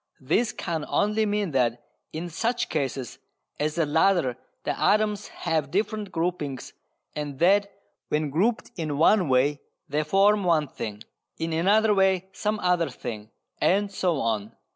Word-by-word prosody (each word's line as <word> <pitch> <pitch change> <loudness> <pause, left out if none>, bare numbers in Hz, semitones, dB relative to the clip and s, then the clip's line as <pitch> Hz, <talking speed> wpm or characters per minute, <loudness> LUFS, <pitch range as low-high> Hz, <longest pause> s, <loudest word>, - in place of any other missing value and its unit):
This 165 - +1
can 165 -3 -3
only 210 +1 +1
mean 205 -3 -1
that 120 -3 0 0.3
in 165 +3 -4
such 230 +9 -1
cases 135 -4 -3 0.4
as 150 +1 -1
the 165 -2 +2
latter 160 -3 +2 0.3
the - - -1
atoms 210 0 +2
have 160 -5 -2
different 205 +2 -2
groupings 165 -6 -3 0.4
and 145 -2 -4
that 200 +5 +3 0.4
when 150 -1 0
grouped 220 - 0
in 155 -5 -3
one 175 +1 +4
way 135 +3 +2 0.3
they 150 +2 0
form 195 +6 +3
one 165 -4 +2
thing, 105 -4 -6 0.3
in 165 0 -2
another 210 +6 +3
way 190 -1 +2
some 215 0 -1
other 180 -3 +2
thing, 110 -4 -7 0.3
and 200 +2 +2
so 180 -5 0
on. 110 -3 -2
170 Hz, 145 wpm, -26 LUFS, 145-200 Hz, 0.4 s, one